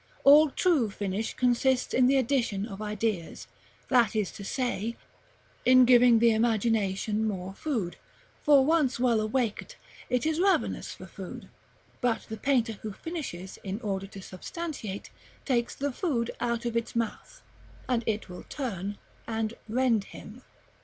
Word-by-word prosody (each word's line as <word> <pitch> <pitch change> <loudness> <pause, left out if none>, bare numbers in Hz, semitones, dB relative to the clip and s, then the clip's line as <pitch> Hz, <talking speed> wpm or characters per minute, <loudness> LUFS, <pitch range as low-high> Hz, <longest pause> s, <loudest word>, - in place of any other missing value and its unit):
All 295 +2 +8
true 290 - +2
finish 200 +1 -3
consists 250 +1 +2
in 250 0 +5
the 270 +1 +4
addition 235 -6 0
of 205 -2 -8
ideas, 210 -4 -3 0.4
that 235 -4 +4
is 210 -4 0
to 200 - -9
say, 235 -1 -2 0.7
in 255 0 +7
giving 245 -1 +6
the 230 +1 +5
imagination 220 -2 +1
more 195 -3 -3
food; 215 - -3 0.4
for 280 -3 +5
once 295 -6 +2
well 240 -3 +3
awaked, 230 - -2 0.3
it 250 +1 +1
is 315 0 0
ravenous 385 +1 +1
for - - -10
food: - - -9 0.5
but 245 -3 +1
the 220 - -5
painter 235 -6 +1
who 215 - -5
finishes 230 - -6
in 195 +2 -4
order 195 -3 -3
to 195 -1 -10
substantiate 215 - -6 0.3
takes 240 -3 0
the 285 +1 -2
food 250 - -1
out 235 -1 -1
of 235 -1 -2
its 230 0 -2
mouth, 230 -2 -4 0.4
and 245 -2 +1
it 215 -1 -1
will 180 -1 -9
turn 205 - -4 0.3
and 225 -1 -2 0.2
rend 230 -3 +2
him. 230 +5 -11
230 Hz, 145 wpm, -28 LUFS, 210-255 Hz, 0.7 s, All